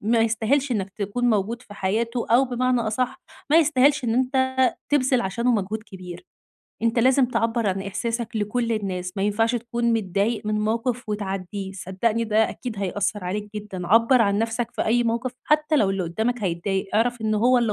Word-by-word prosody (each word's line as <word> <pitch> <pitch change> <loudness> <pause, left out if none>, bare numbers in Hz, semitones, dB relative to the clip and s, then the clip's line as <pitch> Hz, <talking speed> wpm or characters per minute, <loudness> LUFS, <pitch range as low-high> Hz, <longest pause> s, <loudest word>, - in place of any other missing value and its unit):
ما 230 +3 +2
يستاهلش 230 +5 +1
إنّك 195 -4 -2
تكون 210 +5 -2
موجود 225 +3 -1
في 205 -4 -13
حياته 230 +5 -1
أو 245 +4 +5
بمعنى 250 0 0
أصح، 250 +4 -2 0.3
ما 310 - +6
يستاهلش 290 -2 +3
إن 225 -1 0
أنت 260 +1 +1 0.3
تبذل 260 -3 +2
عشانه 235 +6 0
مجهود 215 0 -2
كبير. 185 - -10 0.6
أنت 230 +1 +1
لازم 260 +2 +4
تعبّر 230 -1 0
عن 195 0 -1
إحساسك 230 +3 -3
لكل 230 +3 -1
الناس، 185 -4 -3
ما 195 - -1
ينفعش 225 +3 +1
تكون 235 0 -1
متضايق 210 +1 -1
من 215 0 0
موقف 230 +2 -1
وتعدّيه. 195 -1 -4
صدّقني 195 +5 -1
ده 220 0 +2
أكيد 240 -5 -6
هيأثّر 200 0 -2
عليك 205 +3 -3
جدًا. 195 -4 -6
عبّر 230 +4 +5
عن 200 -1 +1
نفسك 225 +1 -1
في - - -2
أي 240 +2 +2
موقف 235 +2 -1
حتّى 305 0 +2
لو 205 -8 +3
اللي 195 -1 -1
قدّامك 220 +8 -2
هيتضايق. 190 +2 -1
أعرف 240 +2 +1
إن 215 0 0
هو 245 +4 +4
اللي 230 -3 +1
225 Hz, 180 wpm, -24 LUFS, 200-245 Hz, 0.6 s, ما